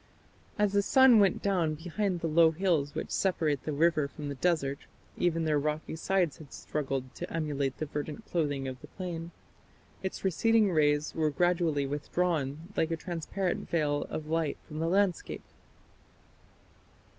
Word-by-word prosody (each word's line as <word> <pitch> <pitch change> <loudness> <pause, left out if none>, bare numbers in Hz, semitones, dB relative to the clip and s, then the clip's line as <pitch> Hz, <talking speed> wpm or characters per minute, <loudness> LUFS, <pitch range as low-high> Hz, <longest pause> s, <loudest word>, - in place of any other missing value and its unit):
As 205 -1 +2
the 200 - +4
sun 260 +2 +6
went 195 -3 +3
down 175 -6 +1
behind 175 +3 -2
the 165 - 0
low 165 +1 +5
hills 160 -4 0
which - - -4
separate 155 -7 0
the 155 - -1
river 155 0 +2
from 145 +1 -7
the - - -3
desert 140 -2 0 0.4
even 165 -2 +1
their 150 -2 +2
rocky 150 +2 -2
sides 175 -1 0
had 150 -4 -12
struggled 135 -3 -3
to - - -7
emulate 145 -4 -1
the 155 - -2
verdant 150 +8 -5
clothing 145 -5 -1
of 130 -1 -6
the - - -11
plain 170 -3 -6 0.7
its 190 0 -4
receding 215 +3 +3
rays 150 -2 +2
were 155 -1 +1
gradually 165 -2 +1
withdrawn, 155 +2 -2
like 160 - +1
a 165 - -1
transparent 175 +2 -3
veil 145 -3 0
of 155 - -4
light 160 -1 -1
from 155 - -6
the 165 - 0
landscape. 195 -2 0
160 Hz, 155 wpm, -30 LUFS, 145-180 Hz, 0.7 s, sun